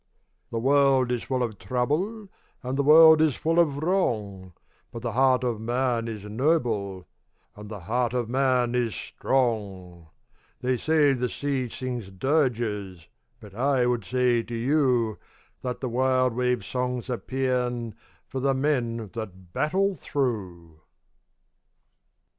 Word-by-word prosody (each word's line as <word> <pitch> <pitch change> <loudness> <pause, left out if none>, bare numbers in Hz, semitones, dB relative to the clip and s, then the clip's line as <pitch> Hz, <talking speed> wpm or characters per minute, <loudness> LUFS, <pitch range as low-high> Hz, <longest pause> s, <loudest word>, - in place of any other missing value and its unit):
The 115 - -4
world 135 0 +3
is 120 -2 -1
full 130 -2 -1
of 110 -4 -4
trouble, 165 - -2 0.4
And 130 +1 -3
the 140 - +1
world 160 +2 +8
is 155 -4 +3
full 165 +2 +1
of 150 -3 +1
wrong, 105 - -1 0.4
But 115 - -8
the 120 - -2
heart 130 +1 +3
of 120 -3 -2
man 120 0 0
is 110 -3 -6
noble, 105 - -1 0.5
And 105 0 -10
the 105 -3 -7
heart 120 +6 0
of 120 -2 -1
man 125 -1 +1
is 120 -3 0
strong! 100 -9 -2 0.5
They 125 0 0
say 150 0 +3
the 125 -1 -1
sea 135 -3 -2
sings 125 -5 -5
dirges, 105 - -1 0.3
But 105 -2 -13
I 130 +2 +1
would 120 -3 0
say 125 +1 +1
to 120 +1 -7
you 125 -3 +1 0.4
That 125 -1 -4
the 130 - -2
wild 130 0 +2
wave's 125 0 0
song's 125 -1 -3
a 125 -2 -2
paean 125 -3 -2 0.3
For 135 - -5
the 135 +1 +1
men 120 -6 -1
that 95 -6 -8
battle 195 +6 +1
through. 95 - -4
125 Hz, 140 wpm, -26 LUFS, 110-135 Hz, 0.5 s, world